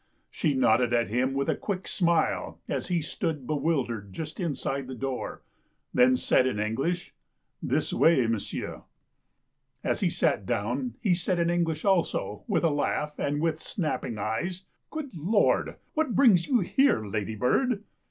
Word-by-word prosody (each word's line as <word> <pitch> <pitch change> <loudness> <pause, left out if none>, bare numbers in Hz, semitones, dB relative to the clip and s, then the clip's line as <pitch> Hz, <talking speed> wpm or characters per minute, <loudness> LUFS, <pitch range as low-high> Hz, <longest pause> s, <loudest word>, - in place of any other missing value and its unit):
She 145 - 0
nodded 120 -1 +3
at 120 -2 +2
him 130 +4 0
with 140 0 0
a - - +2
quick 190 -3 -4
smile 170 -4 +1
as - - -2
he 175 -3 0
stood 150 -2 -3
bewildered 130 -9 -1
just 155 - -6
inside 140 -5 -2
the 130 - -6
door, 130 +1 -4 0.5
then 125 +1 +5
said 130 - +3
in 115 -5 -1
English: 135 +12 -1 0.2
" - - -51
This - - +1
way, 160 -7 +4
m'sieu'." 115 -2 -3 1.0
As - - 0
he - - +2
sat 95 - 0
down 120 +2 -1
he 195 - +3
said 180 +1 0
in 170 0 +2
English 165 -2 0
also, 165 - +1
w - - +1
ith - - 0
a 165 - +4
laugh 150 +1 -1
and 145 +1 0
with 160 -1 0
snapping 150 - -3
eyes: 170 - -2
" - - -52
Good 295 - -6
Lord, 190 +7 +2 0.2
what 305 -6 0
brings 205 -11 +5
you 250 -5 +3
here, 225 - +2
ladybird 120 - 0
150 Hz, 160 wpm, -28 LUFS, 120-175 Hz, 1.0 s, then